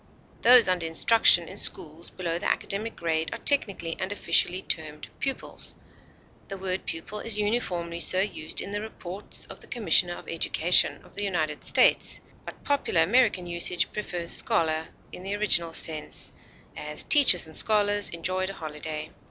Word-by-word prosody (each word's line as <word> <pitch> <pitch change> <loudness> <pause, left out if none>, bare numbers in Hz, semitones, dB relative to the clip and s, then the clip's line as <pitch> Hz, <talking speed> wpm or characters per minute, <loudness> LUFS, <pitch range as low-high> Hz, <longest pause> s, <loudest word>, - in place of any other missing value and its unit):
Those 245 -2 +8
under 180 -3 0
instruction 170 0 +5
in 190 - -9
schools 165 -1 +1
below 170 -2 -4
the - - -2
academic 215 +3 -3
grade 160 -1 -2
are - - -6
technically 195 - +2
and 190 +1 -4
officially 190 -2 +1
termed 150 -2 -6
pupils. 270 -1 -3 0.7
The 195 - -7
word 190 0 -4
pupil 165 +6 -6
is 220 0 -3
uniformly 180 -6 -2
so 185 +2 +1
used 190 -5 -3
in 200 - -7
the 205 0 -3
Reports 200 -2 -4
of - - -12
the - - -15
Commissioner 180 - +1
of - - -13
Education 165 +1 +1
of - - -20
the 205 - -4
United 160 -6 -2
States, - - +3 0.3
but - - -11
popular 275 - +1
American 205 -1 +2
usage 175 +1 -1
prefers 175 -5 -5
scholar 160 -8 +1 0.2
in - - -9
the 195 +2 -4
original 185 -5 +1
sense; 155 -2 -1 0.4
as, 150 0 -6
teachers 270 - +5
and 160 -1 -9
scholars 205 -1 +3
enjoyed 185 +3 -3
a - - -6
holiday. 155 -1 -7
180 Hz, 160 wpm, -26 LUFS, 165-205 Hz, 0.7 s, Those